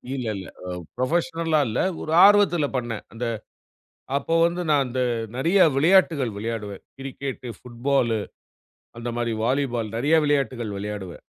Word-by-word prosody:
இல்ல, 130 -3 -4
இல்ல. 95 - -8 0.2
அ - - -4 0.3
புரொஃபஷனல்லா 165 +3 0
இல்ல. 110 - -2 0.2
ஒரு 155 - -5
ஆர்வத்துல 200 -6 +5
பண்ணேன். 120 -3 -4
அந்த 115 +2 -4 0.9
அப்போ 145 +4 -1
வந்து 175 +1 -2
நான் 145 -2 +4
அந்த 125 +1 -3 0.4
நெறையா 170 +9 +4
விளையாட்டுகள் 155 - +3
விளையாடுவேன். 105 -2 -5 0.2
கிரிக்கெட்டு, 135 -1 -6
புட்பாலு, 120 -2 0 0.8
அந்த 120 +1 -5
மாரி 120 -1 -1
வாலிபால் 120 -4 -1
நெறையா 145 +7 +3
விளையாட்டுகள் 130 -7 0
விளையாடுவேன். 100 -3 -6
130 Hz, 125 wpm, -24 LUFS, 115-155 Hz, 0.9 s, ஆர்வத்துல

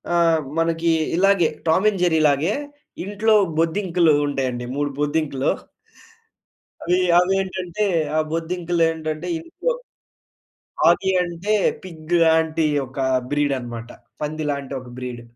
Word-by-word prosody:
ఆహ్, 165 -2 +3 0.2
మనకి 165 0 +1 0.3
ఇలాగే 195 -2 +4 0.2
'టామ్ 175 +6 +3
అండ్ 195 -4 -4
జెర్రీ‌లాగే.' 160 0 +2 0.5
ఇంట్లో 210 +2 +1 0.3
బొద్దింకలు 170 -1 +2
ఉంటాయండి. 130 -3 -2
మూడు 145 0 -1
బొద్దింకలు. 145 -2 0 1.3
అవి 180 +1 +2 0.2
అవి 180 +2 +1
ఏంటంటే 185 +1 -3 0.3
ఆ - - +3
బొద్దింకలేంటంటే 165 -1 -1
ఇంట్లో - - -3 1.2
ఆగి 190 - +2
అంటే 175 +4 -3 0.3
పిగ్ 165 -2 -7
లాంటి 160 0 +2 0.2
ఒక 130 - -16 0.3
బ్రీడ్ 145 -1 +1
అన్నమాట. 120 -1 -7 0.3
పంది 155 +1 -3
లాంటి 140 -1 -5
ఒక 125 - -12
బ్రీడ్. 125 -2 -6
160 Hz, 110 wpm, -22 LUFS, 145-180 Hz, 1.3 s, ఇలాగే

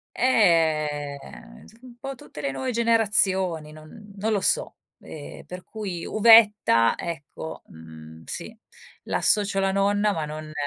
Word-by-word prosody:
Ehm, 160 - 0
insom 225 +2 -19
un 250 -2 -13
po' 270 +1 -6
tutte 150 - -11
le 140 - -1
nuove 255 - -4
generazioni, 195 -8 +1
non 155 +7 -14
non 215 +3 -1
lo 205 - +1
so. - - 0 0.2
Ehm, 150 -2 -10
per 180 0 -9
cui 195 -6 -6
uvetta, 210 - +5
ecco, 160 -1 -7
mhmm, 80 0 -13
sì 200 +6 -6 0.5
l'associo 205 -1 0
alla 195 0 +1
nonna 205 +1 +1
ma 160 -5 -3
non 155 0 -8
190 Hz, 135 wpm, -24 LUFS, 155-215 Hz, 0.5 s, uvetta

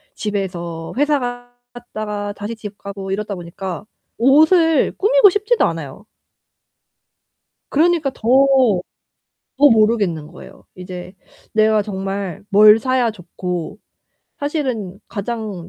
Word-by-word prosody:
집에서 175 -5 -4
회사 290 +1 +2 0.5
갔다가 210 -4 -5
다시 205 +3 -6
집 210 -2 -9
가고 195 -1 -7
이러다 205 +1 -3
보니까 175 +1 -7 0.3
옷을 315 +6 +4
꾸미고 455 +1 +5
싶지도 420 +5 +1
않아요. 165 +3 -5 1.7
그러니까 320 -2 +2
더, - - -20 1.4
더 290 +1 +6
모르겠는 215 - +2
거예요. - - -14
이제 180 0 -9 0.4
내가 215 0 +3
정말 195 -3 -5
뭘 210 +2 +7
사야 255 -1 +1
좋고 180 -1 -6 0.6
사실은 260 - -3
가장 205 -4 -5
210 Hz, 225 characters per minute, -19 LUFS, 190-260 Hz, 1.7 s, 뭘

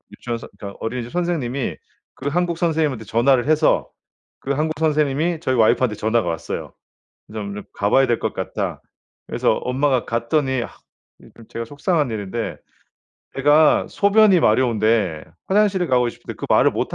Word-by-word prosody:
유치원 120 -1 -4
선 - - -11
그러니까 100 -1 -8
어린이집 120 +1 -4
선생님이 150 -8 -2 0.4
그 135 - -6
한국 170 +2 0
선생님한테 155 -9 0
전화를 120 +4 +2
해서 155 0 +2 0.5
그 135 - -4
한국 155 +2 -1
선생님이 155 +1 +1
저희 130 -5 0
와이프한테 115 0 +3
전화가 110 -3 0
왔어요. 80 - -5 0.6
"좀 105 -2 -5
좀 105 - -6
가봐야 120 +7 +3
될 120 - +1
것 - - -3
같다." - - -4 0.5
그래서 - - +1
엄마가 130 0 0
갔더니 130 +2 0
아 - - -7 0.5
이 - - -16
좀 115 - -15
제가 115 - -5
속상한 145 +2 -1
일인데 110 +1 -4 0.8
애가 145 +3 +4
소변이 200 -2 +4
마려운데 110 - +2 0.2
화장실을 190 -3 +2
가고 125 -1 +3
싶은데 - - -9
그 - - -6
말을 - - +4
못 - - -3
130 Hz, 355 characters per minute, -21 LUFS, 115-155 Hz, 0.8 s, 애가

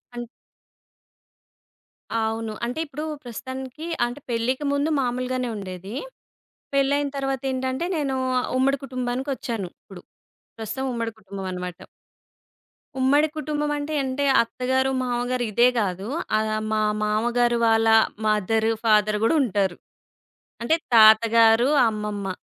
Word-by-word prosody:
అన్ 240 0 -5 1.9
అవును. 220 0 -2
అంటే 250 +6 -4
ఇప్పుడు 300 +1 -7 0.2
ప్రస్తుతానికి 260 +5 -7 0.2
అంటే 245 +4 -6
పెళ్ళికి 250 +5 -1
ముందు 285 +3 +1
మామూలుగానే 250 0 -2
ఉండేది. 190 +1 -7 0.8
పెళ్ళైన 280 +1 +2
తర్వాత 270 -1 -2
ఏంటంటే 260 +4 -2
నేను 275 -3 -1 0.4
ఉమ్మడి 275 +1 +2
కుటుంబానికొచ్చాను. 250 -5 -3
ఇప్పుడు 185 -3 -13 0.6
ప్రస్తుతం 225 +5 -4
ఉమ్మడి 230 -1 -3
కుటుంబం 195 -1 -7
అనమాట 180 0 -6 1.2
ఉమ్మడి 290 +4 +4
కుటుంబం 295 -1 -2
అంటే, 290 +2 -4
అంటే 265 +2 -2 0.2
అత్తగారు, 260 +3 0
మామగారు 245 0 -1
ఇదే 240 +4 +5
కాదు. 195 0 -2 0.3
ఆహ్, 215 0 0 0.2
మా 215 0 +1 0.2
మామగారు 240 +3 +1
వాళ్ళ 225 0 +3 0.4
మదర్, 215 +1 +1 0.2
ఫాదర్ 210 -1 +3
కూడా 325 - +3
ఉంటారు. 195 -5 0 0.9
అంటే 320 +7 +3 0.2
తాతగారు, 225 +2 +6 0.2
అమ్మమ్మ. 210 -3 -4
240 Hz, 105 wpm, -24 LUFS, 215-265 Hz, 1.9 s, తాతగారు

